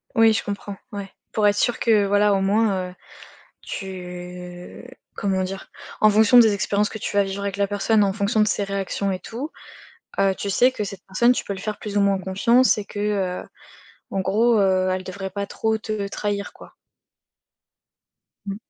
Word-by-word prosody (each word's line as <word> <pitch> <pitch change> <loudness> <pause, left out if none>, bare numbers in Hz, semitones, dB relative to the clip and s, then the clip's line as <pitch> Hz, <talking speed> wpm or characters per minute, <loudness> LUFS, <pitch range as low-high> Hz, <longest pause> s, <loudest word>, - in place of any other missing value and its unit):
Oui 225 -1 +6
je - - -1
comprends. 200 0 -5 0.2
Ouais. 200 -1 -6 0.2
Pour 210 -1 +2
être 205 - +3
sûr 240 +3 +1
que 215 -3 +3
voilà, 205 +1 +3
au 195 - +1
moins, 195 -2 +1
heu, 180 - -14 0.7
tu 180 -1 -8 0.3
comment 190 -2 0
dire? 190 +1 -6 0.3
En 215 - +7
fonction 215 +3 +6
des 220 -3 +6
expériences 205 +1 0
que 220 - -7
tu 205 - -4
vas 200 - +5
vivre 195 +1 -5
avec 200 -1 -3
la 200 - +2
personne, 205 +2 +2
en 195 - +1
fonction 210 +2 0
de 210 - +4
ses 200 - 0
réactions 195 0 -2
et 185 - -3
tout, 255 +10 -6 0.7
heu, 195 -1 +3
tu 200 - -4
sais 250 +6 +4
que 220 - -4
cette 195 -1 -8
personne, 235 +6 +3
tu - - -1
peux 200 - -3
lui 190 - -8
faire 215 0 -4
plus 210 -1 -6
ou - - +4
moins 200 -1 +2
confiance 210 +8 +3
et 205 - -4
que, 205 - -7 0.4
heu, - - -16 0.6
en 195 - -1
gros, 220 +5 +3
heu, 185 -1 +2
elle 185 - -2
devrait 190 +1 -6
pas 200 +1 -4
trop 220 +2 -1
te 215 -2 -3
trahir 200 0 -3
quoi. - - -15 1.7
Mmh. 195 - -3
200 Hz, 195 wpm, -23 LUFS, 195-215 Hz, 1.7 s, En